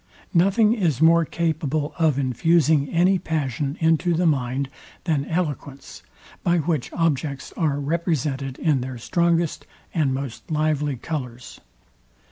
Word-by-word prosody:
Nothing 200 +5 +4
is 170 - 0
more 165 +1 +5
capable 155 -3 -1
of 155 -4 +3
infusing 145 +2 +2
any 180 +3 +3
passion 145 -3 -2
into 165 +1 +2
the 175 +2 +1
mind, 135 -3 0 0.4
than 150 -5 0
eloquence, 145 -5 -4 0.4
by 175 0 +2
which 160 -5 -1
objects 145 -4 -1
are 145 -4 0
represented 145 -4 -2
in 150 -5 +1
their 130 0 -5
strongest 170 +5 0 0.3
and 150 -5 +1
most 130 -2 -5
lively 150 -2 0
colours. 125 -3 -6
155 Hz, 120 wpm, -23 LUFS, 140-170 Hz, 0.4 s, more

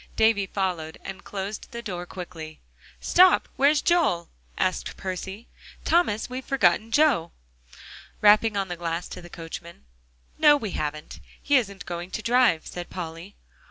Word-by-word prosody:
Davie 220 -3 +3
followed, 180 -5 -2
and 195 0 -8
closed 200 +1 -5
the 235 0 -7
door 180 -4 -5
quickly. 165 -4 -8 0.4
"Stop! 365 +1 +5
where's 285 +2 +3
Joel?" 320 - +2 0.3
asked 185 - -1
Percy. 190 +4 -6 0.4
"Thomas, 325 -11 +2
we've 255 +1 -6
forgotten 225 -4 +2
Joe," 255 - +3 0.9
rapping 210 +1 +5
on 195 -1 0
the 175 - -4
glass 170 0 -3
to 180 - -8
the 175 - -12
coachman. 165 - -9 0.5
"No, 295 -1 +7
we 215 -8 -4
haven't; 150 -1 -4 0.2
he 290 - +1
isn't 200 -7 0
going 175 +1 -5
to 215 - -5
drive," 240 -8 +3
said 175 -1 -7
Polly. 170 +2 -7
195 Hz, 145 wpm, -25 LUFS, 175-235 Hz, 0.9 s, No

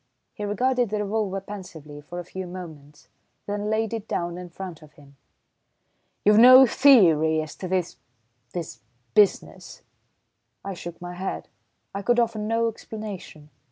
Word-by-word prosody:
He 210 - -5
regarded 245 +3 +1
the 210 0 -1
revolver 205 -2 -2
pensively 170 -7 -10
for 175 +4 -9
a 175 - -4
few 185 +1 -7
moments, 155 -5 -11 0.4
then 205 +1 -3
laid 220 0 -1
it 225 -1 -5
down 175 0 -2
in 180 0 -8
front 175 -2 -8
of 155 -1 -17
him. 140 -1 -19 1.1
"You've 210 +1 +6
no 255 +2 +10
theory 170 - +5
as 155 -1 -5
to 185 - -5
this 180 -1 -2 0.5
this 170 -3 -6 0.3
business?" 205 -2 +1 0.8
I 195 - -4
shook 175 -1 -9
my 175 0 -7
head, 185 +2 -5 0.4
I 200 - -4
could 240 +4 +2
offer 230 -2 0
no 225 +2 0
explanation. 210 -9 -8
195 Hz, 150 wpm, -24 LUFS, 170-220 Hz, 1.1 s, no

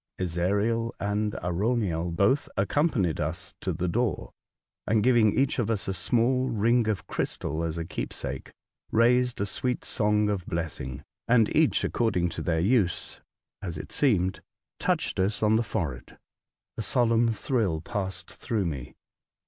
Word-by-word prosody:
Ezariel 100 +7 0
and 105 +1 -1
Arauniel 90 -2 0
both 100 +11 +2
accompanied 100 - +1
us 85 +5 -3
to 95 - -1
the 90 +2 -2
door, 115 +4 -1 0.6
and, 110 0 +3
giving 120 -4 +4
each 135 -1 +2
of 115 -3 0
us 110 -4 -1
a 95 - 0
small 125 +6 +1
ring 115 +1 +2
of 95 -3 -2
crystal 80 -2 -2
as 80 0 -2
a 85 - -3
keepsake, - - -5 0.4
raised 125 +2 +3
a 100 - +1
sweet 125 +5 -2
song 105 -1 +2
of 100 -4 -2
blessing; 75 -5 -4 0.2
and 115 -2 +4
each 155 -1 +3
according 90 -7 +1
to 85 - -5
their 80 -2 0
use, 100 -3 +1 0.4
as 85 -5 -4
it - - -8
seemed, 95 -9 +1 0.4
touched - - 0
us 100 +3 0
on 110 +1 +4
the 115 - +3
forehead. 70 - -4 0.6
A - - -2
solemn 115 +1 +2
thrill 110 - 0
passed 95 +1 -4
through 110 -6 -2
me. 70 -7 -5
105 Hz, 150 wpm, -27 LUFS, 90-115 Hz, 0.6 s, giving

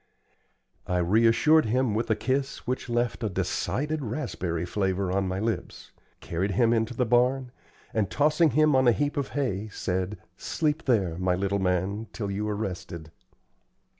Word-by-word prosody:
I 90 - 0
reassured 115 - +4
him 120 +1 +1
with 115 +2 -1
a 110 - +3
kiss 135 +4 -2
which 125 0 -3
left 120 0 -1
a 110 - 0
decided 130 - -2
raspberry 90 - -3
flavor 95 0 -1
on 95 0 0
my 95 +1 -2
lips, 110 +2 -4 0.3
carried 95 +4 -2
him 115 +4 +3
into 115 +1 0
the 125 - +1
barn, 125 +2 +2 0.4
and, 105 -4 0
tossing 155 +2 +3
him 155 +2 +3
on 130 -1 +4
a 120 - +6
heap 145 +5 -1
of 140 -5 -2
hay, 110 -7 -1
said, 95 0 -2 0.2
"Sleep 155 0 -1
there, 95 -10 +1
my 90 -1 +1
little 100 +2 -1
man, 95 +4 -1
till 100 -3 -3
you 105 +2 -2
are 105 - -1
rested." 90 -6 -5
110 Hz, 165 wpm, -27 LUFS, 95-130 Hz, 0.4 s, a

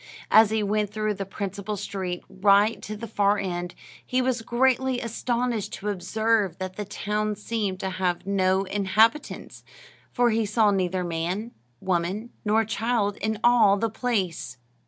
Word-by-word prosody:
As 220 -1 +7
he 220 -1 0
went 205 0 0
through 215 0 -1
the 195 -1 -5
principal 200 +1 -4
street, 185 -2 -4
right 200 +3 +3
to 215 0 -6
the 230 - -6
far 205 -1 +2
end, 175 -3 -4 0.3
he 255 - 0
was 255 -2 0
greatly 255 +2 +1
astonished 235 -1 -2
to 210 - -4
observe 210 -1 0
that 185 0 -5
the 210 - -4
town 210 +1 -2
seemed 205 -2 -3
to 190 - -2
have 180 -1 -1
no 190 -1 +2
inhabitants, 205 +7 +1 0.5
for 245 -1 +2
he 225 +1 +1
saw 210 0 +3
neither 185 -1 0
man, 175 +7 -3 0.3
woman, 185 +5 -1
nor 220 +1 +2
child 220 -2 0
in 220 0 -2
all 230 -5 +5
the 225 +1 -1
place. 210 - -2
210 Hz, 155 wpm, -25 LUFS, 190-225 Hz, 0.5 s, As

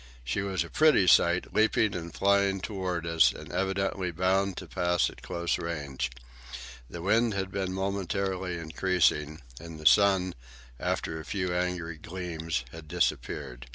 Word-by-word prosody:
She - - -1
was 95 -2 -1
a - - -10
pretty 155 -11 +5
sight, 85 0 +4
leaping 110 -1 +3
and 85 -2 -5
flying 100 +1 +2
toward 95 -4 -3
us, 80 -1 +4
and 75 - -10
evidently 95 0 -1
bound 95 +3 +1
to - - -6
pass 90 0 +1
at - - -16
close 85 0 -2
range. 75 -7 -3 0.8
The 85 +6 -7
wind 110 +2 +2
had 95 -1 -2
been 95 -2 -2
momentarily 95 -1 -2
increasing, 80 -2 0 0.2
and 80 -1 -9
the 80 - -11
sun, 95 +1 +5 0.5
after 80 - -2
a - - -7
few 90 -2 -2
angry 90 -2 -2
gleams, 85 -6 -4
had 80 -1 -10
disappeared. 60 -4 -2
90 Hz, 150 wpm, -28 LUFS, 80-95 Hz, 0.8 s, pretty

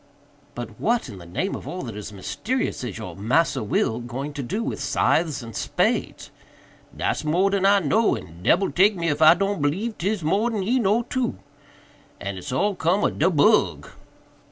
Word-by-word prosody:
"But 120 -3 -7
what, 235 +1 0
in 100 - -9
the 85 - -12
name 180 - -2
of - - -7
all 180 - -5
that 115 -5 -6
is 105 0 -7
mysterious, 220 - -3
is 115 -7 -5
your 90 -2 -7
'Massa 135 - +1
Will' 110 +2 0
going 130 +5 -5
to 145 - -4
do 200 - -3
with - - -3
scythes 155 -6 +1
and 115 -3 -9
spades?" - - -1 0.7
"Dat's - - -1
more 180 +6 +2
dan 195 -1 +2
I 200 0 +6
know, 215 +9 +2
and 85 0 -10
debbil 180 - +2
take 200 +3 +4
me 170 -2 -1
if 150 +1 -1
I 155 +2 +8
don't 195 -1 -1
b'lieve 195 +11 -1
'tis 195 0 -1
more 200 +9 +1
dan 215 -4 -2
he 245 +7 +1
know, 220 +2 +2
too. 245 0 -2 0.8
But 100 - -4
it's 95 +7 -7
all 200 +11 +1
cum 180 +3 +1
ob - - 0
do 165 - +4
bug." 150 -6 +3
165 Hz, 195 wpm, -24 LUFS, 120-200 Hz, 0.8 s, I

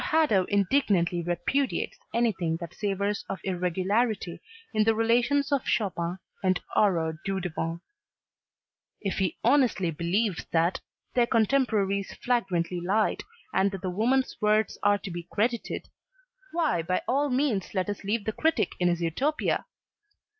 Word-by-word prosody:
Hadow 300 - +3
indignantly 195 -4 +2
repudiates 175 +11 -1 0.2
anything 190 -9 +1
that 170 -2 -7
savors 200 0 -1
of 195 - -3
irregularity 190 +2 0 0.3
in 215 -1 +3
the 225 +1 +3
relations 245 +6 +2
of 280 -2 +1
Chopin 180 -4 0 0.2
and 185 -1 +2 0.2
Aurore 165 -6 +2
Dudevant. 175 -3 -3 1.2
If 195 -1 -2
he 185 -4 0
honestly 240 -9 +3
believes 175 +5 0
that 170 +2 +2 0.3
their 240 -1 +3
contemporaries 215 -5 +1
flagrantly 185 -8 0
lied 200 +5 +1 0.3
and 195 +1 +3
that 195 -1 -7
the 185 - -1
woman's 250 +7 +1
words 215 0 +2
are 205 0 +4
to 195 -1 -7
be 170 0 -6
credited, 235 +3 -1 0.6
why 315 - +1
by 180 +3 -1
all 280 +3 +2
means 250 -8 0
let 185 -1 0
us 205 0 -4
leave 205 +1 -1
the 220 - -1
critic 320 +7 +1
in 180 - +3
his 175 -1 +1
Utopia. 270 - 0
200 Hz, 135 wpm, -27 LUFS, 180-235 Hz, 1.2 s, are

